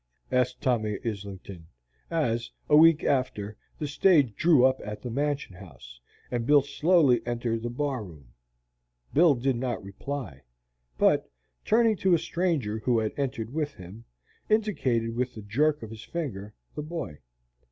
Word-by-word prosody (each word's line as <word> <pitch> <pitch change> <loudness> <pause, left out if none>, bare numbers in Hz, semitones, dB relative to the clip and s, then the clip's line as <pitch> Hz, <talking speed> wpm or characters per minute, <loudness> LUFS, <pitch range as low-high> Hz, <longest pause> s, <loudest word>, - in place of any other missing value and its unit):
asked 125 0 +1
Tommy 110 -7 0
Islington, 100 -5 -6 0.4
as, 120 -8 -1 0.2
a 150 - +5
week 160 0 +6
after, 125 -6 -1 0.2
the 150 - -3
stage 145 - +3
drew 155 -7 +5
up 130 0 +2
at 105 0 -7
the 125 - -4
Mansion 140 -3 -2
House, 65 -10 -13 0.3
and 120 -1 -2
Bill 145 -1 +6
slowly 145 -3 +3
entered 120 -1 -2
the 120 - -3
bar 130 -1 -2
room. 75 -10 -14 0.8
Bill 160 -1 +5
did 125 +1 0
not 120 -5 -3
reply, 100 - -6 0.6
but, - - +3 0.3
turning 225 -1 +3
to 185 -2 +3
a - - +3
stranger 160 - -1
who 120 +2 +1
had 110 -1 -1
entered 125 -4 -3
with 150 -2 -2
him, 95 +6 -12 0.4
indicated 130 - +1
with 125 -1 -2
a - - -6
jerk 145 +7 +1
of 110 - -8
his 110 0 -9
finger 110 - -5 0.2
the - - -5
boy. 150 - -6
125 Hz, 150 wpm, -27 LUFS, 110-150 Hz, 0.8 s, week